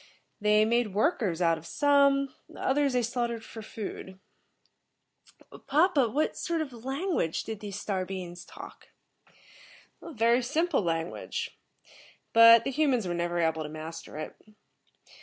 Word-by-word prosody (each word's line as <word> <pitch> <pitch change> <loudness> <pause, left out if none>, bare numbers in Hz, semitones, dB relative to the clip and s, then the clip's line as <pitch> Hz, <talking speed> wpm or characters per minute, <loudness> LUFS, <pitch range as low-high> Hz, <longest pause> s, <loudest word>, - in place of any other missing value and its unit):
They 210 0 +4
made 230 -3 0
workers 210 - +1
out 165 -1 +2
of 165 - -13
some, 280 - +3 0.2
others 280 0 +1
they 250 -1 +1
slaughtered 235 -1 -2
for 225 - -9
food." 195 -3 -8 1.5
"Papa, 295 -4 +3
what 295 +7 0
sort 335 0 -2
of 250 -7 -7
language 270 - -1
did 220 -2 -6
these 205 -2 -6
Star 190 -3 -2
beings 180 -2 -7
talk?" - - -12 1.1
"A - - -9
very 235 -1 +3
simple 315 +7 0
language, 175 - -3 0.8
but 230 0 +8
the 270 - -2
humans 265 -7 +1
were 175 - -2
never 175 0 -2
able 160 -2 +1
to 150 - -5
master 155 0 -8
it. 155 - -6
230 Hz, 135 wpm, -28 LUFS, 180-275 Hz, 1.5 s, but